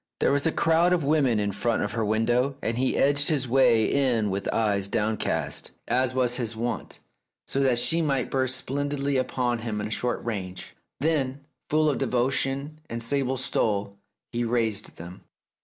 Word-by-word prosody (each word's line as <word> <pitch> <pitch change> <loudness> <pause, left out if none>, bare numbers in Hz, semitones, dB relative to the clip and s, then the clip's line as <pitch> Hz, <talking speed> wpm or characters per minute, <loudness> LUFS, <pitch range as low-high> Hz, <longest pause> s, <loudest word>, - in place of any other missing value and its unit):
There - - +3
was 140 +2 +2
a - - +2
crowd 170 +3 +3
of 175 -4 +1
women 140 -6 +2
in 100 -1 0
front 115 +3 0
of 105 - -2
her 115 0 -1
window, 120 +5 +1
and 115 - -1
he 130 +2 0
edged 145 +1 +3
his 140 -5 +2
way 115 -3 +4
in 120 -7 +1
with 95 +1 -2
eyes 100 -3 +1
downcast, 105 +2 -1 0.2
as 130 +1 +1
was 125 -1 +1
his 115 -3 -2
wont, 120 +2 -4 0.5
so 135 - -1
that 130 -3 +3
she 165 +7 +3
might 135 -5 0
burst 130 -1 0
splendidly 140 +1 -1
upon 125 -2 -1
him 110 -2 -3
at 105 +1 -3
short 120 +1 -2
range. 95 -5 -5 0.2
Then, 140 -3 0 0.3
full 155 +1 +3
of 145 - +1
devotion 135 +3 0
and 115 0 -3
sable 135 +2 0
stole, 100 -5 -1 0.3
he 120 0 -1
raised 115 -3 -1
them. 85 +2 -10
125 Hz, 175 wpm, -26 LUFS, 110-140 Hz, 0.5 s, way